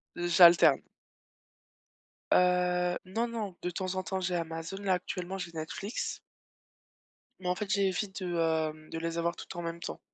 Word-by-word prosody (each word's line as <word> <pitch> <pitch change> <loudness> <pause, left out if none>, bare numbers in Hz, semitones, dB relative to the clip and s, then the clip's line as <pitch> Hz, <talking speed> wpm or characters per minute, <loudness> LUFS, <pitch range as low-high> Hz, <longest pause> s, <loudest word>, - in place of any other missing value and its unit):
J'alterne. 170 -4 +6 1.5
Heu, 180 0 +3 0.2
non, 235 +1 +1
non, 215 -5 -4
de 180 - -1
temps 185 +1 -3
en 185 - -1
temps, 190 0 -3
j'ai 180 -1 -1
Amazon. 165 +2 -4
Là, 190 -2 +2
actuellement, 180 +1 -4
j'ai 175 -2 -5
Netflix 180 +7 -4 1.2
mais 180 - -3
en 180 - +2
fait, 205 +2 -4
j'évite, 195 0 0
heu, 180 -1 -2 0.6
de 165 - -4
les 165 0 -3
avoir 170 +1 0
toutes - - -9
en 175 - -4
même 170 0 -4
temps. - - -6
180 Hz, 155 wpm, -30 LUFS, 170-190 Hz, 1.5 s, J'alterne